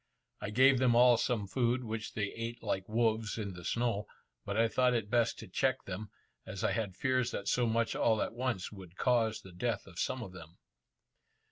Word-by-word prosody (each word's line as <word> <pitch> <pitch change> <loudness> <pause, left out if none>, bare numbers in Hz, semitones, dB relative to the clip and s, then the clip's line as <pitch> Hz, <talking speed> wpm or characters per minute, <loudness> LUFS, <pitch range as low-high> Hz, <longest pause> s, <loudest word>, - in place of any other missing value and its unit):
I 105 - -3
gave 130 +4 +5
them 125 -2 +4
all 120 0 +7
some 115 -5 0
food, 120 +4 0
which 110 -2 -5
they 100 -2 -2
ate 115 +1 -5
like 95 +1 -2
wolves 110 -1 +1
in 100 -4 -4
the 90 -1 -10
snow, 115 0 -1 0.4
but 100 - -2
I 115 +1 +4
thought 125 +1 +2
it 110 -2 -2
best 120 -1 +2
to 110 - -9
check 130 +7 0
them, 100 +2 -6 0.3
as 95 - -6
I - - +2
had 105 -5 -2
fears 130 -2 +1
that 100 - -5
so 125 -1 +2
much 115 0 +1
all 110 -2 +2
at - - -5
once 120 -5 -2
would 95 -4 -12
cause 115 -3 +2
the 95 - -13
death 110 +3 -2
of 90 -3 -10
some 130 -1 -1
of 95 - -8
them. 85 -2 -12
115 Hz, 210 wpm, -32 LUFS, 100-120 Hz, 0.4 s, all